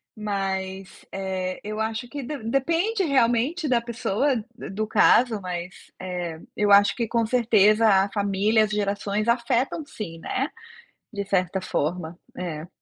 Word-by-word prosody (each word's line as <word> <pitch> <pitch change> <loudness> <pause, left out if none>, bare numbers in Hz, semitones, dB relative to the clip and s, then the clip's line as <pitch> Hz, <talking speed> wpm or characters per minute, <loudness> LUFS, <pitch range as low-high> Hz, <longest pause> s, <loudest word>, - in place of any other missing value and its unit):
mas, 195 -2 -4
eh, 190 -1 -3
eu 215 +1 -5
acho 220 +2 -2
que 285 -2 -6
de 290 +4 -4
depende 335 - +1
realmente 275 +3 +2
da 245 -2 +4
pessoa 235 +3 0 0.2
do 235 - -8
do 215 +2 -2
caso, 230 -1 +4
mas, 180 0 -7
eh, 175 -3 -4 0.2
eu 205 -1 +2
acho 200 0 +6
que 235 -2 -1
com 230 0 +1
certeza 220 -2 +4
a 195 -1 +4
família, 205 +2 +2
as 210 - -2
gerações 205 +1 -1
afetam 245 +6 +1
sim, 185 - -7
né, 265 - -2 0.6
de 200 -1 -3
certa 190 -1 0
forma, 170 -1 -3 0.2
é. 165 -3 -5
210 Hz, 145 wpm, -24 LUFS, 190-240 Hz, 0.6 s, acho